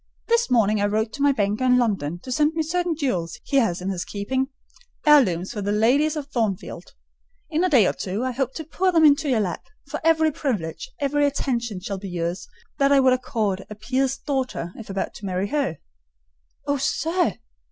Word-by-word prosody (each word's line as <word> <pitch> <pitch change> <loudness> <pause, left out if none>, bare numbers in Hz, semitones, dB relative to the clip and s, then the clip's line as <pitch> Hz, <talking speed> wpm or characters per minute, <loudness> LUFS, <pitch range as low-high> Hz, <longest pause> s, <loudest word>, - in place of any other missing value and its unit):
This 470 0 +3
morning 215 -4 +3
I 205 - +3
wrote 215 +1 -1
to 285 - -6
my 285 0 +5
banker 210 -1 0
in 250 -1 +5
London 195 -10 0
to 255 - -7
send 300 +4 +2
me 320 - +1
certain 350 +1 -1
jewels 185 - -2
he 275 - 0
has 200 -9 +2
in 185 - -3
his 185 -2 -2
keeping,—heirlooms 260 - 0
for 215 -4 -4
the 200 +1 -1
ladies 265 +9 +3
of 300 -2 -4
Thornfield. 205 -9 -3 0.6
In 320 +3 +1
a 370 - +3
day 250 - +5
or - - +1
two 200 +5 -3
I 260 - -1
hope 260 +1 -2
to 320 - -4
pour 365 +4 0
them 325 -3 +5
into 290 0 +4
your 235 -4 +2
lap: 180 -4 -3 0.2
for - - -5
every 320 -1 +4
privilege, 245 - -3
every 290 0 +2
attention 235 -8 -2
shall 195 0 -4
be 195 0 -7
yours 175 0 -3 0.3
that 275 0 +4
I 280 - +6
would 260 -1 +5
accord 215 -6 -1
a 210 - -7
peer's 260 +5 -1
daughter, 260 - -3
if 225 - -10
about 195 0 -3
to 205 - -9
marry 185 +2 -1
her." 280 - -1 0.9
"Oh, 285 0 +1
sir! 325 - 0
250 Hz, 200 wpm, -23 LUFS, 200-285 Hz, 0.9 s, I